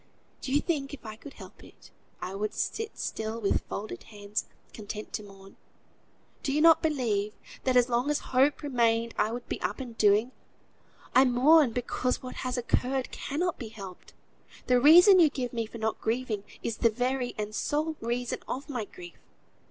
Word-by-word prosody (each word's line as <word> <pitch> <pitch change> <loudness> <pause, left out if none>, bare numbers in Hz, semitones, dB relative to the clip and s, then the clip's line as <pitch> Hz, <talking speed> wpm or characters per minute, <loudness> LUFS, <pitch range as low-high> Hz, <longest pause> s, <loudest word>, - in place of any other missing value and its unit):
Do 260 - -5
you 290 +2 +3
think 285 -4 -2
if 260 - -23
I 215 -1 -6
could 275 +6 -12
help - - -13
it, - - -17 0.3
I 185 - -4
would 210 +2 -3
sit 445 -1 -3
still 220 +1 -3
with 200 -3 +1
folded 215 +2 -5
hands, 205 -1 -4 0.3
content 210 0 -7
to 215 - -2
mourn? 195 -1 -15 0.8
Do 275 - -2
you 290 - +1
not 325 0 +6
believe 225 -9 0 0.3
that 255 -1 +3
as 245 -1 +5
long 245 +3 0
as 295 - -2
hope 275 +4 +3
remained 235 -4 +1
I 215 +1 +2
would 240 +1 -6
be - - -4
up - - -2
and 245 -3 -7
doing? 210 +4 +4 0.8
I 260 - +7
mourn 265 +3 +5
because 250 +2 -2
what 255 - -7
has 255 0 -3
occurred 255 +2 0
cannot 345 +5 -2
be 235 - -5
helped. 195 -4 -11 0.5
The 250 -1 +3
reason 355 - +8
you 325 -3 +7
give 255 -4 -4
me 230 -2 -2
for 230 - -9
not 220 0 -2
grieving, 225 -3 -2 0.2
is 230 - -2
the 230 - +4
very 250 +2 -1
and 210 0 -4
sole 305 +7 -1
reason 240 +1 -2
of 275 +3 -5
my 245 -6 -3
grief. 175 -3 -12
245 Hz, 185 wpm, -28 LUFS, 215-275 Hz, 0.8 s, reason